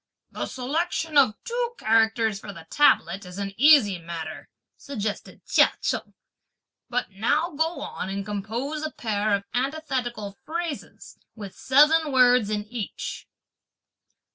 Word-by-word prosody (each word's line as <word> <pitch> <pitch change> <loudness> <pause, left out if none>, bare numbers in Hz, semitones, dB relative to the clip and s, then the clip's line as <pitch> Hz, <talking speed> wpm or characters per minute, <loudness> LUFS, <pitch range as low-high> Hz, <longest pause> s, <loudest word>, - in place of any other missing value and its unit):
"The - - -4
selection 310 +4 -2
of 265 -7 +5
two 475 0 -2
characters 225 -1 +2
for 210 - -8
the 165 -4 -12
tablet 200 -9 +3
is 180 0 -10
an 200 -1 -4
easy 260 - +5
matter," 165 -2 -7 0.3
suggested 215 -7 -6
Chia - - +4
Cheng, - - -3 0.7
"but 250 -3 -2
now 290 - 0
go 320 0 -1
on 240 -10 -5
and 195 0 -4
compose 225 +9 -4
a 310 - -2
pair 215 -5 0
of 200 - -4
antithetical 250 -6 -3
phrases 335 -1 -6 0.2
with 205 -4 -9
seven 300 +3 +4
words 250 -4 +5
in 210 -1 -1
each." 240 - -6
240 Hz, 130 wpm, -25 LUFS, 205-300 Hz, 0.7 s, of